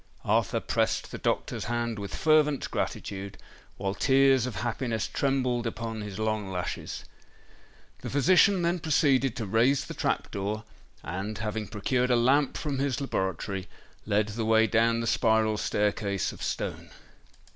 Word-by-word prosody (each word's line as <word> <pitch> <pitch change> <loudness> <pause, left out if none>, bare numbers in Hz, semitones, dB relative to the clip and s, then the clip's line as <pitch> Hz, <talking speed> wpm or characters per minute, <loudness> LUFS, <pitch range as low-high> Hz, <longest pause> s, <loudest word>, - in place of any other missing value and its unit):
Arthur - - +2
pressed - - -1
the - - -6
doctor's - - -1
hand 115 -1 -2
with 100 -1 -5
fervent 150 -3 +2
gratitude, 100 0 -4 0.4
while 95 0 -2
tears 135 +1 +4
of 125 - -5
happiness 115 -1 -2
trembled 125 -3 0
upon 115 -1 -4
his 105 -2 -6
long 110 -2 -1
lashes. 90 -2 -4 0.9
The - - -6
physician 180 +6 +4
then 170 +1 +1
proceeded 135 -5 +2
to 115 -4 -3
raise 115 +7 +2
the - - -7
trap - - -1
door; 105 +2 -3 0.4
and, 95 +5 -4
having 105 0 -3
procured 125 +4 0
a 125 - +4
lamp 135 +4 +3
from 140 -3 -3
his 140 -2 0
laboratory, 95 - -2 0.4
led 105 0 +2
the 110 +2 -3
way 110 0 +4
down 115 +1 +2
the - - -2
spiral 110 -2 +2
staircase 105 -2 0
of - - -12
stone. - - -3
115 Hz, 145 wpm, -28 LUFS, 105-135 Hz, 0.9 s, tears